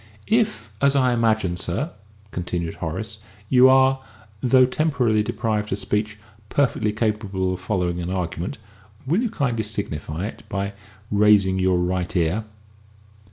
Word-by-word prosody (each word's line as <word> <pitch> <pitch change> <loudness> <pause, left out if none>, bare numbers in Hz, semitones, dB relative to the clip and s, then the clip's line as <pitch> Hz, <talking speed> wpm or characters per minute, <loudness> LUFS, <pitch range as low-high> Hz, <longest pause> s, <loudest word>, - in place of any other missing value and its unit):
"If, 215 - +1
as 140 0 +4
I 130 -2 +3
imagine, 110 -6 +1
sir," 115 - -2 0.4
continued 85 -2 -3
Horace, 110 +7 -4 0.3
"you 130 0 +7
are, 130 0 +4 0.4
though 130 0 +5
temporarily 125 -6 +1
deprived 105 -1 -2
of 95 - 0
speech, 105 +2 -2 0.3
perfectly 125 -6 +1
capable 105 -4 -1
of 90 - -5
following 90 -3 -1
an 85 - -4
argument, 90 -1 -3 0.5
will 170 - +2
you 245 - 0
kindly 125 - -1
signify 90 -5 -3
it 110 - -7
by 100 0 -2 0.4
raising 100 -2 +4
your 95 -1 +3
right 90 +1 -1
ear?" 90 +5 +1
105 Hz, 135 wpm, -23 LUFS, 95-125 Hz, 0.5 s, you